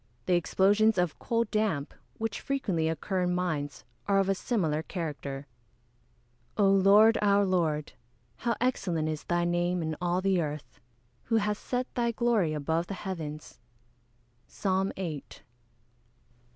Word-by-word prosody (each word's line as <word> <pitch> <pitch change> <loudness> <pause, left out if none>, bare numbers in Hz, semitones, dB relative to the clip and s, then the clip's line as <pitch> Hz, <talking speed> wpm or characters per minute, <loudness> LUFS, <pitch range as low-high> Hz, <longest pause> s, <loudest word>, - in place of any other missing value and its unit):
The 185 - +2
explosions 205 +5 +3
of 180 -2 0
"coal 230 0 +1
damp," 210 -10 -1 0.2
which 225 -2 -3
frequently 190 -13 -1
occur 185 +3 -2
in 180 0 +1
mines, 155 -6 -2 0.2
are 200 -1 +3
of 195 0 +2
a - - +4
similar 175 -7 -1
character. 145 -5 -5 1.1
[Verse: 205 - +4
"O 195 - +5
Lord, 200 +3 +6
our 200 -1 +4
Lord, 165 -5 0 0.4
how 235 -1 -1
excellent 180 -10 0
is 155 -1 -4
thy 175 0 +1
name 175 0 0
in 160 0 -2
all 175 0 +1
the 190 -2 +2
earth! 150 -2 -6 0.5
who 225 - 0
hast 210 -1 0
set 250 0 -1
thy 235 -1 +1
glory 230 -8 +1
above 160 +3 -1
the 195 - -4
heavens." 160 -8 -6 0.9
PSALM 190 -1 0
VIII. 165 -7 -4
185 Hz, 140 wpm, -29 LUFS, 160-210 Hz, 1.1 s, Lord